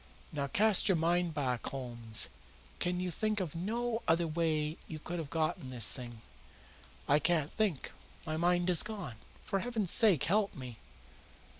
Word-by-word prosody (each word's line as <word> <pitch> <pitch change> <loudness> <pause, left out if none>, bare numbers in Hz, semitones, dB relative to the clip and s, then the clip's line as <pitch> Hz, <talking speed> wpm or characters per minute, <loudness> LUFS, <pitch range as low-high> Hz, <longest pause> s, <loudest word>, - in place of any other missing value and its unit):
Now 140 -2 -2
cast 210 +7 +5
your 190 - +4
mind 170 0 +1
back, 125 -5 -2
Holmes. 120 -4 -1 0.5
Can 180 0 0
you 180 -1 -2
think 215 +4 -1
of 175 -6 -3
no 230 +6 -2
other 165 +1 +3
way 155 -1 -1
you 155 - -6
could 175 +3 -5
have 155 -4 -5
got 155 +1 -1
this 120 -4 +2
thing?" 120 -3 -6 0.8
"I 145 +1 +4
can't 155 -1 +1
think. 200 -10 -1 0.3
My 155 - -3
mind 175 +2 +2
is 170 - +6
gone. 200 - -6 0.3
For 195 -2 -1
heaven's 220 -4 -2
sake 210 - +6
help 205 +2 +1
me!" 125 -4 -9
165 Hz, 160 wpm, -32 LUFS, 140-190 Hz, 0.8 s, is